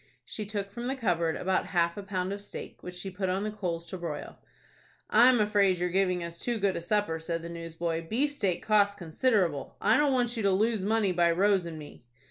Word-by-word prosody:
She 210 Hz, -2 st, -6 dB
took 200 Hz, -2 st, -4 dB
from 235 Hz, +3 st, -5 dB
the 265 Hz, -, -1 dB
cupboard 170 Hz, -9 st, 0 dB
about 185 Hz, 0 st, 0 dB
half 170 Hz, 0 st, +3 dB
a 205 Hz, -, -5 dB
pound 190 Hz, -1 st, -2 dB
of 200 Hz, -, -6 dB
steak, 205 Hz, -, -9 dB
which 180 Hz, 0 st, -8 dB
she 190 Hz, +2 st, -5 dB
put 190 Hz, 0 st, -2 dB
on 190 Hz, +2 st, 0 dB
the 215 Hz, -, -2 dB
coals 175 Hz, -5 st, -3 dB
to 185 Hz, -, -5 dB
broil. 160 Hz, -4 st, -6 dB, 0.7 s
"I'm 245 Hz, +2 st, +6 dB
afraid 205 Hz, -3 st, +3 dB
you're 180 Hz, +1 st, -1 dB
giving 180 Hz, -1 st, +1 dB
us 170 Hz, 0 st, -7 dB
too 240 Hz, -1 st, -1 dB
good 200 Hz, -2 st, +1 dB
a -, -, -3 dB
supper," 175 Hz, -2 st, 0 dB
said 165 Hz, 0 st, -3 dB
the 170 Hz, -, -6 dB
newsboy. 165 Hz, 0 st, -4 dB
"Beefsteak 225 Hz, -, 0 dB
costs 205 Hz, -2 st, +3 dB
considerable. 175 Hz, -, 0 dB
I 215 Hz, -, +4 dB
don't 295 Hz, -1 st, +3 dB
want 245 Hz, -2 st, +1 dB
you 225 Hz, -, -2 dB
to 200 Hz, -1 st, +3 dB
lose 215 Hz, +1 st, +1 dB
money 210 Hz, -1 st, +2 dB
by 175 Hz, -1 st, +3 dB
Rose 190 Hz, +1 st, +2 dB
and 165 Hz, -1 st, -7 dB
me." 150 Hz, -5 st, -11 dB
190 Hz, 220 wpm, -29 LUFS, 170-210 Hz, 0.7 s, I'm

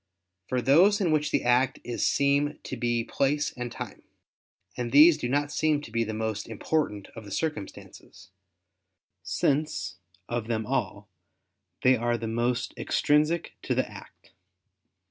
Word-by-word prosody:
For 125 Hz, -1 st, -1 dB
those 185 Hz, +10 st, +5 dB
in 180 Hz, -5 st, +1 dB
which 150 Hz, -1 st, +1 dB
the -, -, 0 dB
act 125 Hz, +2 st, +2 dB
is 120 Hz, -, -1 dB
seem 140 Hz, +1 st, +2 dB
to -, -, -5 dB
be 120 Hz, -1 st, 0 dB
place 145 Hz, +5 st, 0 dB
and 125 Hz, -1 st, -5 dB
time: -, -, -7 dB, 0.7 s
and 120 Hz, -1 st, -3 dB
these 150 Hz, +4 st, +8 dB
do 125 Hz, -5 st, -4 dB
not 145 Hz, +2 st, 0 dB
seem 155 Hz, 0 st, +1 dB
to 130 Hz, -, -11 dB
be 115 Hz, 0 st, +1 dB
the 110 Hz, -, -4 dB
most 110 Hz, -1 st, -3 dB
important 110 Hz, -2 st, -2 dB
of 115 Hz, -, -8 dB
the 105 Hz, -, -11 dB
circumstances, 95 Hz, -, -6 dB, 0.9 s
since, 135 Hz, -11 st, -1 dB, 0.3 s
of 120 Hz, -2 st, -3 dB
them 110 Hz, -2 st, -1 dB
all, -, -, -2 dB, 0.8 s
they 130 Hz, 0 st, +6 dB
are 120 Hz, 0 st, 0 dB
the 115 Hz, -, -5 dB
most 120 Hz, +2 st, -1 dB
extrinsic 155 Hz, +3 st, +1 dB
to -, -, -1 dB
the -, -, 0 dB
act. -, -, -14 dB
125 Hz, 150 wpm, -27 LUFS, 115-150 Hz, 0.9 s, these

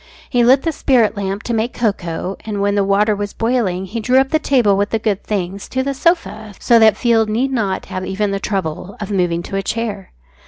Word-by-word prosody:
He 245 Hz, -1 st, +3 dB
lit 260 Hz, +3 st, +5 dB
the 330 Hz, -, 0 dB
spirit 250 Hz, -7 st, +2 dB
lamp 200 Hz, 0 st, -3 dB
to 240 Hz, -, -3 dB
make 225 Hz, +2 st, -1 dB
cocoa, 190 Hz, -4 st, -2 dB
and 210 Hz, -2 st, -4 dB
when 200 Hz, 0 st, +1 dB
the 200 Hz, -1 st, +2 dB
water 205 Hz, +2 st, +2 dB
was 205 Hz, 0 st, -4 dB
boiling 225 Hz, -6 st, -1 dB
he 220 Hz, +5 st, -5 dB
drew 250 Hz, +4 st, +2 dB
up 265 Hz, 0 st, +3 dB
the 315 Hz, -, +2 dB
table 245 Hz, -9 st, +3 dB
with 200 Hz, +1 st, 0 dB
the 225 Hz, -, 0 dB
good 210 Hz, -3 st, -2 dB
things 195 Hz, -1 st, -4 dB
to 260 Hz, 0 st, -1 dB
the 275 Hz, +1 st, -2 dB
sofa, 265 Hz, -, -1 dB
so 235 Hz, -2 st, +4 dB
that 220 Hz, -2 st, +5 dB
Field 225 Hz, -3 st, +2 dB
need 250 Hz, +5 st, 0 dB
not 210 Hz, -7 st, -1 dB
have 185 Hz, -, -5 dB
even 200 Hz, +2 st, -1 dB
the 195 Hz, -, -2 dB
trouble 195 Hz, 0 st, -4 dB
of 205 Hz, -1 st, -5 dB
moving 175 Hz, -3 st, 0 dB
to 195 Hz, -, -4 dB
a -, -, 0 dB
chair. 210 Hz, -2 st, -4 dB
210 Hz, 230 wpm, -18 LUFS, 195-240 Hz, -, lit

